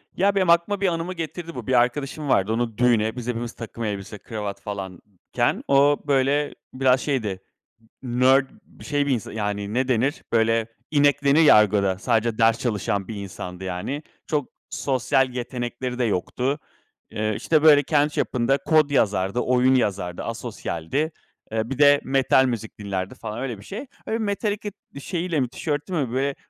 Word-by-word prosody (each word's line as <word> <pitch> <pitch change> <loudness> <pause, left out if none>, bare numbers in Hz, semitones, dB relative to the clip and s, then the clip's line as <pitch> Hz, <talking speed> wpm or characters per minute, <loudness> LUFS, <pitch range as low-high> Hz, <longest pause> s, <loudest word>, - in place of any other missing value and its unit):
Ya, 200 +2 +2
benim 185 -3 +2
aklıma 170 +4 +3
bir 195 - +3
anımı 170 +1 -2
getirdi 170 0 -6
bu: 125 - -7
Bir 130 - +1
arkadaşım 135 +4 +1
vardı. 105 -1 +2
Onu 115 -2 -2
düğüne, 115 -3 +2
biz 125 -1 -6
hepimiz 120 -1 -3
takım 115 0 -7
elbise, 105 -1 -4
kravat 105 -1 -6
falanken 95 -1 -3
o 140 +1 +5
böyle 140 +1 +1 0.2
biraz 130 0 +3
şeydi, 110 -10 -2 0.6
nerd 130 +2 +3 0.2
bir - - -16
şey, 145 -1 0
bir - - +1
insan 115 - -3
yani, 105 -1 -3
ne 130 +2 +1
denir 130 +5 0
böyle, 115 0 +2 0.2
inek 145 -2 +3
denir 140 +3 +5
ya 155 - +8
argoda, 100 -3 +3
sadece 115 +1 0
ders 115 0 +4
çalışan 100 -4 -1
bir 110 - -6
insandı 95 -2 -7
yani. 95 - -4 0.2
Çok 150 -4 -1 0.2
sosyal 130 0 +1
yetenekleri 125 0 -4
de - - +2
yoktu. 125 +7 -1 0.5
Eee, 110 0 -1
işte, 155 +6 +1
böyle, 145 -2 +7
kendi 150 +1 +2
çapında 130 +1 +1
kod 155 +1 +3
yazardı, 100 -5 +1
oyun 125 +1 +3
yazardı, 100 -7 -1
asosyaldi. 135 - -3 0.4
Eee, 110 +1 -2
bir 135 - -4
de 145 -1 +6
metal 135 0 +3
müzik 115 -4 -4
dinlerdi 95 -2 -4
falan, 110 0 -6
öyle 125 -4 -4
bir 100 - -14
şey. 215 - -7 0.2
Öyle 225 - 0
Metallica 205 -1 -2 0.2
bir 140 - -8
şeyiyle 170 0 -2
mi 125 -3 0
tişört 145 +3 -3
mü, 150 -10 -1
böyle 135 +2 0
125 Hz, 170 wpm, -24 LUFS, 110-145 Hz, 0.6 s, ya